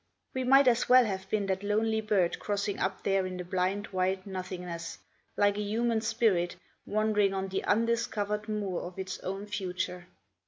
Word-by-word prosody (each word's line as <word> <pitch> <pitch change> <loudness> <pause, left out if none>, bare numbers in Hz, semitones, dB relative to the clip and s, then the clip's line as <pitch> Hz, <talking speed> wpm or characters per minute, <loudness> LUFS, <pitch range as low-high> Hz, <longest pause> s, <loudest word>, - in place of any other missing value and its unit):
We 260 - -1
might 270 +2 +6
as 245 0 +3
well 255 0 +8
have 190 -2 -4
been 210 -1 0
that 190 0 -1
lonely 220 +2 +1
bird 200 -5 +1
crossing 205 0 -2
up 190 - -2
there 195 -1 +1
in 185 0 -5
the 180 - -4
blind 185 +3 -1
white 185 0 0
nothingness, 180 -3 -5 0.4
like 205 0 +3
a - - 0
human 225 +2 0
spirit 220 -7 +1 0.3
wandering 210 -2 +2
on 190 0 -2
the 190 - -2
undiscovered 215 -1 0
moor 200 -4 -2
of 175 +1 -8
its 190 -1 -4
own 195 +2 -4
future. 180 -3 -4
200 Hz, 170 wpm, -30 LUFS, 185-215 Hz, 0.4 s, well